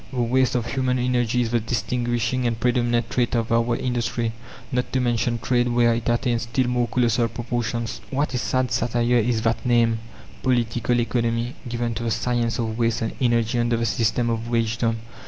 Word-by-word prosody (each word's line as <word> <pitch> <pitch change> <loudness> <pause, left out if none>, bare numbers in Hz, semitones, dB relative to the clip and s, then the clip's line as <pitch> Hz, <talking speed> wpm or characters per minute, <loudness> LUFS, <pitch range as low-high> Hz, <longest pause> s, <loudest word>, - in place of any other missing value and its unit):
The 130 - -4
waste 125 +1 +2
of 120 -2 0
human 130 -1 0
energy 125 -1 +1
is 115 -2 -1
the 120 - +2
distinguishing 120 +2 -1
and 115 -1 -2
predominant 120 -1 +1
trait 125 -1 +1
of 115 -1 -1
our 115 +1 +2
industry, 120 -2 -1 0.4
not 125 0 -1
to 130 - +2
mention 120 -1 +1
trade 120 +1 +1
where 120 -1 +3
it 115 0 -2
attains 120 0 +1
still 120 +3 0
more 125 -1 +1
colossal 120 0 +2
proportions. 115 0 -3
What 140 +1 -1
a 125 - 0
sad 130 -1 0
satire 120 +1 +1
is 115 0 0
that 115 0 0
name, 120 -2 +3 0.4
Political 120 -1 +1
Economy, 115 0 -1 0.2
given 120 0 -2
to 115 - -5
the 115 - -1
science 115 +1 0
of 115 -1 -3
waste 115 0 +1
and 110 - -2
energy 120 -1 +2
under 120 0 +1
the 115 - 0
system 115 +1 +1
of 115 0 -3
wagedom! 115 0 0
120 Hz, 185 wpm, -23 LUFS, 115-125 Hz, 0.4 s, where